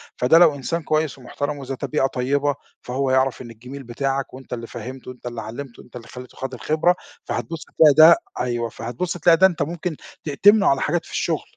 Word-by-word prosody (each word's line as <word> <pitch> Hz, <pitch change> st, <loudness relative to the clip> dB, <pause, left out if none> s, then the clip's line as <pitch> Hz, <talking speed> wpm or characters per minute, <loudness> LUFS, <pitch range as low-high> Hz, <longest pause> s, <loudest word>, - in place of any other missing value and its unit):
فده 130 Hz, +7 st, +4 dB
لو 165 Hz, -4 st, +6 dB
إنسان 165 Hz, +5 st, -3 dB
كويس 155 Hz, -2 st, 0 dB
ومحترَم 145 Hz, +3 st, -4 dB
وإذا 135 Hz, -1 st, -5 dB
طبيعة 135 Hz, 0 st, 0 dB
طيبة 140 Hz, +2 st, 0 dB, 0.3 s
فهو 130 Hz, +1 st, -2 dB
يعرَف 130 Hz, 0 st, +1 dB
إن 120 Hz, -2 st, -9 dB
الجِميل 125 Hz, +5 st, -10 dB
بتاعك 135 Hz, +3 st, -3 dB
وأنت 130 Hz, -1 st, -9 dB
اللي 115 Hz, -1 st, -5 dB
فهِّمته 130 Hz, 0 st, -8 dB
وأنت 125 Hz, -, -16 dB
اللي 120 Hz, -2 st, -5 dB
علّمته 120 Hz, +4 st, -8 dB
وأنت 125 Hz, -, -18 dB
اللي 115 Hz, -1 st, -9 dB
خلّيته 125 Hz, 0 st, -11 dB
خَد 135 Hz, 0 st, -5 dB
الخِبرة 155 Hz, +7 st, +1 dB, 0.3 s
فهتبُص 165 Hz, -2 st, -4 dB
هتلاقي 150 Hz, -3 st, +5 dB
ده 160 Hz, +3 st, +9 dB, 0.2 s
أيوه 120 Hz, -2 st, -1 dB
فهتبُص 125 Hz, +13 st, -4 dB
تلاقى 165 Hz, 0 st, +5 dB
ده 190 Hz, -, +7 dB
أنت 170 Hz, -6 st, -5 dB
ممكن 165 Hz, +2 st, -3 dB, 0.3 s
تأتمنه 200 Hz, +8 st, +4 dB
على 135 Hz, -1 st, +3 dB
حاجات 170 Hz, +3 st, -1 dB
في -, -, -14 dB
الشغل. -, -, -1 dB
135 Hz, 195 wpm, -22 LUFS, 125-155 Hz, 0.3 s, ده